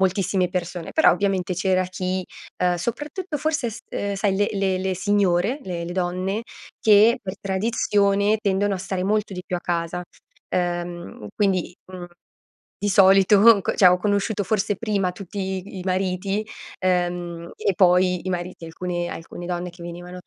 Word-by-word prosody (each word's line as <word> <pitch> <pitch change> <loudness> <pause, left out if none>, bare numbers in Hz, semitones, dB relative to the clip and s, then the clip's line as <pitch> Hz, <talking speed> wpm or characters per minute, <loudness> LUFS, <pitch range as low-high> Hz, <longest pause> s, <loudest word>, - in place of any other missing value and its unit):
moltissime 190 -1 +1
persone. 175 -1 -4
Però, 315 - +5
ovviamente 195 -2 0
c'era 185 +1 +1
chi, 185 0 -3 0.4
uhm, 180 0 +3
soprattutto 295 - -4
forse 300 -4 -1
s 220 - -8 0.2
uhm, 200 0 -2
sai 195 0 +1
le 205 +1 +2
le 195 -2 0
le 190 0 -1
signore, 200 - +1
le 175 -2 -4
le 175 - -5
donne, 185 +3 -1 0.4
che 220 +3 +6
per 190 -1 -5
tradizione, 200 0 +1
tendono 200 0 +1
a - - -4
stare 190 0 -3
molto 210 0 0
di 180 -1 -6
più 180 - -3
a - - -5
casa, 175 0 -2 0.5
uhm, 175 -9 -3
quindi, 190 -4 +1 0.2
mhmm, 180 -1 -7 0.8
di 205 - 0
solito 195 +3 +6
c - - -2
cioè 185 - +7
ho 180 0 +5
conosciuto 205 +1 0
forse 205 0 0
prima 200 -5 0
tutti 190 0 -5
i - - -6
mariti, 190 +3 -1 0.3
ehm, 175 -2 -1
e 200 - 0
poi 180 0 +3
i 185 - -2
mariti, 180 -1 -4
alcune 175 +1 -4
alcune 170 +1 -8
donne 180 0 -3
che 175 0 -12
venivano, 175 +1 -8
185 Hz, 160 wpm, -23 LUFS, 180-200 Hz, 0.8 s, cioè